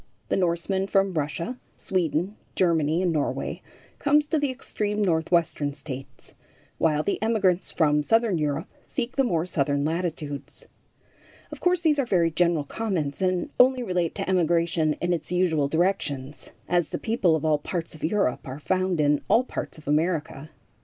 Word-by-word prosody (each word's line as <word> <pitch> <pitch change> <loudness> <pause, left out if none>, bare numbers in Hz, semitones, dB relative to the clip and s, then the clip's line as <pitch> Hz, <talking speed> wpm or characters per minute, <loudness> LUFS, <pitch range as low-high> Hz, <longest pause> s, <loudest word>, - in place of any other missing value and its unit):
The - - +2
Norseman 190 +2 0
from 195 -1 +2
Russia, 165 - -3 0.2
Sweden, 175 +2 -1 0.2
Germany 165 -1 +2
and 175 -2 +1
Norway 150 -2 -2 0.4
comes 295 +1 +3
to 310 +1 0
the 285 -1 0
extreme 210 -5 -3
Northwestern 165 -5 +1
States, 135 -3 -9 0.5
while 155 -2 +2
the 200 - -1
emigrants 195 -5 +1
from 150 -2 +3
southern 225 +2 +2
Europe 150 +1 -1 0.2
seek 235 +2 -3
the 270 - +3
more 170 -9 0
southern 145 -4 0
latitudes. 155 -4 -4 0.9
Of - - -8
course, 360 -1 +2
these 305 -3 +3
are 275 - +2
very 170 -5 +2
general 170 -1 +2
comments, 170 -4 -3
and 185 -1 0
only 255 0 +5
relate 180 -6 -1
to 195 - -3
emigration 170 -3 +2
in 175 +3 -1
its 165 0 -4
usual 170 -5 +2
directions, 150 -4 -1 0.2
as 175 -2 +1
the - - -3
people 200 -7 +2
of 160 0 -2
all 155 -1 +3
parts 165 +2 -4
of 155 - -12
Europe 170 -8 0
are 130 +1 -5
found 185 +2 0
in 145 -1 +3
all 235 - +4
parts 255 - -6
of 155 - -15
America. 155 -1 0
170 Hz, 160 wpm, -25 LUFS, 150-195 Hz, 0.9 s, only